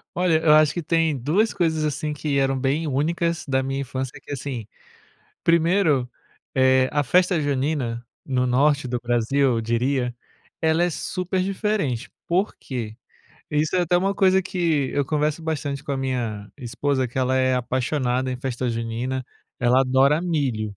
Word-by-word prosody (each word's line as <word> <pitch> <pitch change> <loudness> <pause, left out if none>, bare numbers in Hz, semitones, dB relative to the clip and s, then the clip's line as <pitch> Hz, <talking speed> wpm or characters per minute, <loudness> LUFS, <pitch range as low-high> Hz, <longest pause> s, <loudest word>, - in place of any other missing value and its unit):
Olha, 160 -3 +4
acho 155 -1 +3
que 175 - -4
tem 165 -2 +1
2 165 - +1
coisas, 160 -5 0
assim, 150 +1 -2
que 145 -1 -2
eram 135 -1 +1
bem 140 +5 0
únicas 165 +4 -1
da 135 -1 +1
minha 135 +1 -2
infância 130 0 -4
que, - - -19
assim, 130 -5 -5 0.8
1º, 165 -6 +3 0.4
eh, 130 0 +4
a 145 - +1
festa 180 +5 +3
junina, 140 -4 -1 0.2
no 125 -2 0
norte 140 +2 +2
do 125 0 -1
Brasil 120 +3 0 0.2
eu - - 0
diria, 125 +2 0 0.5
ela 160 +1 +3
é 175 - +3
super 185 +2 -2
diferente, 190 - -1 0.2
por 185 +4 0
quê? 115 -5 -5 0.5
Isso 150 +2 0
é 185 - +3
até 175 0 +2
uma 195 +2 +1
coisa 190 -1 +4
que 165 -7 0
eu 145 - +1
converso 150 +2 -1
bastante 145 -3 -3
com 145 - -4
a - - -1
minha 120 -6 -3
esposa, 130 +1 -1
que 125 - -5
ela 130 0 +1
é 130 0 +2
apaixonada 130 +1 -1
em 125 - -3
festa 125 -1 -3
junina, 115 +3 -3 0.3
ela 125 +1 +4
adora 135 +3 +3
milho. 130 - -1
140 Hz, 160 wpm, -23 LUFS, 130-160 Hz, 0.8 s, Olha